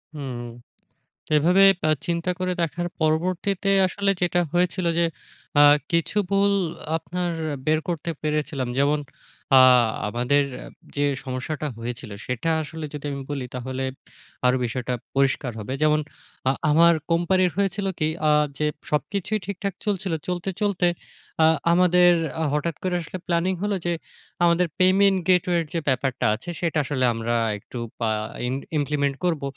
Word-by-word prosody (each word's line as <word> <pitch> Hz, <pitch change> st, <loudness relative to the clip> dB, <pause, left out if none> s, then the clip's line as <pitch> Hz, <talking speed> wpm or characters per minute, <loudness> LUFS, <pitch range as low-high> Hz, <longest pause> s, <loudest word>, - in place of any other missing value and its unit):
হুম। 130 Hz, -4 st, -5 dB, 0.9 s
তো -, -, -13 dB
এভাবে 180 Hz, +5 st, +5 dB, 0.2 s
বা 155 Hz, -, +1 dB, 0.2 s
চিন্তা 170 Hz, +1 st, 0 dB
করে 185 Hz, 0 st, -1 dB
দেখার 175 Hz, +2 st, -1 dB
পরবর্তীতে 180 Hz, +5 st, 0 dB, 0.2 s
আসলে 200 Hz, +1 st, 0 dB
যেটা 175 Hz, 0 st, +2 dB
হয়েছিল 180 Hz, +1 st, +1 dB
যে, 170 Hz, -, +4 dB, 0.5 s
আ -, -, +9 dB, 0.3 s
কিছু 170 Hz, +5 st, 0 dB
ভুল 200 Hz, 0 st, +3 dB, 0.4 s
আপনার 175 Hz, +2 st, -3 dB, 0.3 s
বের 155 Hz, 0 st, +3 dB
করতে 170 Hz, -1 st, -3 dB
পেরেছিলাম। 150 Hz, -4 st, -1 dB
যেমন 145 Hz, +2 st, +3 dB, 0.6 s
আ -, -, +9 dB, 0.5 s
আমাদের 125 Hz, +5 st, +2 dB, 0.5 s
যে, 145 Hz, 0 st, +1 dB, 0.2 s
সমস্যাটা 135 Hz, +4 st, -4 dB
হয়েছিল 115 Hz, -2 st, -6 dB
সেটা 125 Hz, +6 st, -2 dB
আসলে 155 Hz, +1 st, -7 dB
যদি 150 Hz, 0 st, -6 dB
আমি 140 Hz, 0 st, -4 dB
বলি 135 Hz, -3 st, -3 dB
তাহলে 130 Hz, +1 st, -4 dB, 0.6 s
আরো 125 Hz, +1 st, +4 dB
বিষয়টা 125 Hz, +1 st, -3 dB, 0.2 s
পরিষ্কার 135 Hz, -2 st, +1 dB
হবে। 120 Hz, +5 st, -5 dB
যেমন 150 Hz, 0 st, +4 dB, 0.5 s
আ -, -, +5 dB, 0.2 s
আমার 170 Hz, +2 st, +6 dB, 0.2 s
company 175 Hz, +2 st, +3 dB
এর 175 Hz, -, -3 dB
হয়েছিল 200 Hz, 0 st, 0 dB
কি 155 Hz, -, +2 dB, 0.2 s
আ -, -, +5 dB, 0.3 s
যে, 150 Hz, -, 0 dB, 0.3 s
সবকিছুই 200 Hz, +7 st, -1 dB
ঠিকঠাক 200 Hz, -1 st, -3 dB
চলছিল। 195 Hz, -3 st, -1 dB
চলতে, 180 Hz, +1 st, -2 dB
চলতে 195 Hz, -4 st, +2 dB, 0.6 s
আ -, -, +7 dB, 0.3 s
আমাদের 180 Hz, 0 st, +5 dB, 0.3 s
আ -, -, +1 dB
হঠাৎ 150 Hz, +2 st, -1 dB
করে 180 Hz, -1 st, 0 dB
আসলে 175 Hz, +3 st, -6 dB
planning 175 Hz, +2 st, +1 dB
হলো 205 Hz, -1 st, 0 dB
যে, 175 Hz, -, +1 dB, 0.5 s
আমাদের 170 Hz, +1 st, +4 dB
payment 190 Hz, +1 st, +5 dB
gateway 180 Hz, -1 st, +3 dB
এর 165 Hz, -, -2 dB
যে, 165 Hz, -, 0 dB
ব্যাপারটা 130 Hz, 0 st, 0 dB
আছে 120 Hz, +10 st, -10 dB
সেটা 165 Hz, -2 st, -1 dB
আসলে 130 Hz, -1 st, -1 dB
আমরা 115 Hz, +1 st, -2 dB, 0.2 s
একটু 120 Hz, -, -10 dB, 0.2 s
পা 115 Hz, -2 st, 0 dB, 0.4 s
ইন 125 Hz, -, -1 dB, 0.3 s
implement 140 Hz, -1 st, 0 dB
করব 160 Hz, -5 st, 0 dB
165 Hz, 150 wpm, -24 LUFS, 140-180 Hz, 0.9 s, আ